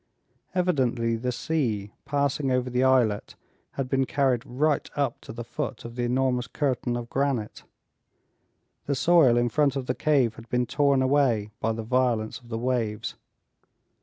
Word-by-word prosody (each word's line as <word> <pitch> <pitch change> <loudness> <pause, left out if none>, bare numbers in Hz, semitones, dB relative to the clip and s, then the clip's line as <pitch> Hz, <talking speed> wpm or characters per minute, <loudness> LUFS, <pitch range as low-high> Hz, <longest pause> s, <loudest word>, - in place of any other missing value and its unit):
Evidently 130 -10 +1
the 125 +2 -2
sea, 115 -8 -2
passing 140 -1 0
over 125 0 0
the 125 +1 +1
islet, 125 -6 +2 0.4
had 135 -2 -3
been 135 +1 +1
carried 130 -3 +1
right 145 +4 0
up 140 -4 -1
to - - -9
the 120 +1 -6
foot 125 0 -5
of 115 0 -8
the 125 - -2
enormous 125 0 +1
curtain 125 -4 -1
of 120 -1 -5
granite. 135 -5 -1 1.3
The 140 - +1
soil 140 -4 +5
in 120 0 +2
front 145 0 +2
of 135 -2 -2
the 125 - 0
cave 130 -6 +1
had 115 0 -12
been 125 0 +1
torn 140 0 +2
away 130 -6 +2
by 115 +1 0
the 110 0 -5
violence 120 -2 0
of 120 -2 -18
the 115 - -3
waves. 115 -3 -1
125 Hz, 165 wpm, -26 LUFS, 115-140 Hz, 1.3 s, soil